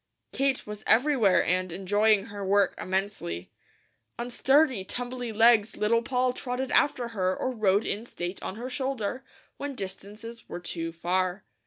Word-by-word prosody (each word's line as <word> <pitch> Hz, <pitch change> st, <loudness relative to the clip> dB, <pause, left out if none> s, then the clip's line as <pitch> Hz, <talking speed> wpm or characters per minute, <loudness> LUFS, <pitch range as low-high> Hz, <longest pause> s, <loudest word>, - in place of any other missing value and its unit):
Kate 275 Hz, -1 st, 0 dB
was 210 Hz, 0 st, -7 dB
everywhere 235 Hz, -5 st, +4 dB
and 185 Hz, 0 st, 0 dB
enjoying 205 Hz, +3 st, +2 dB
her 205 Hz, -3 st, -7 dB
work 195 Hz, 0 st, +3 dB
immensely. 185 Hz, -, -3 dB, 0.7 s
On 240 Hz, +1 st, -4 dB
sturdy, 265 Hz, -4 st, +3 dB
tumbly 245 Hz, +3 st, -5 dB
legs 225 Hz, 0 st, +4 dB
Little 230 Hz, +2 st, +2 dB
Poll 250 Hz, +1 st, 0 dB
trotted 250 Hz, +1 st, -4 dB
after 245 Hz, -4 st, +2 dB
her 185 Hz, -4 st, -1 dB
or 260 Hz, -, -1 dB
rode 210 Hz, -3 st, +2 dB
in 220 Hz, +4 st, -3 dB
state 175 Hz, -2 st, -5 dB
on 190 Hz, -, -5 dB
her 240 Hz, +3 st, -5 dB
shoulder, 260 Hz, -3 st, -3 dB, 0.3 s
when 285 Hz, -1 st, -5 dB
distances 210 Hz, +3 st, -8 dB
were -, -, -5 dB
too 165 Hz, -1 st, -3 dB
far. 180 Hz, +3 st, -1 dB
215 Hz, 150 wpm, -27 LUFS, 190-250 Hz, 0.7 s, everywhere